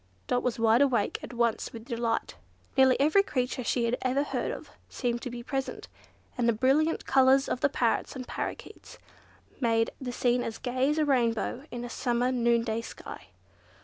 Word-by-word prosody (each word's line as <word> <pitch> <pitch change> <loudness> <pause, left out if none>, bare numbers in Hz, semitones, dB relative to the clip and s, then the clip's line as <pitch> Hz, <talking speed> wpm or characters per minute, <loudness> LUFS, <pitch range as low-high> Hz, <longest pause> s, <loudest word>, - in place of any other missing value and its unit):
Dot 245 - +1
was 250 - -1
wide 230 +2 +4
awake 245 -7 +2
at - - -8
once 235 -2 0
with 225 -1 -9
delight. 235 -2 -2 0.4
Nearly 265 -1 +5
every 310 +8 +5
creature 255 -7 -2
she 235 +1 0
had 235 +2 0
ever 260 +2 +1
heard - - -2
of - - -7 0.2
seemed 240 -2 -2
to 255 - -5
be 240 0 -7
present, 270 +1 -4 0.5
and 240 -1 +1
the - - +4
brilliant 275 +8 +2
colours 265 +1 +4
of - - -2
the 285 - +3
parrots 235 -1 0
and 255 -1 -6
parrakeets - - -6 0.6
made 225 -2 +2
the 250 -2 -3
scene 245 0 +1
as 225 - -4
gay 255 +2 0
as 300 - 0
a 310 - +2
rainbow 245 -1 0
in 240 0 -5
a - - -5
summer 245 0 0
noonday 235 -2 +1
sky. - - -10
245 Hz, 180 wpm, -28 LUFS, 235-265 Hz, 0.6 s, Nearly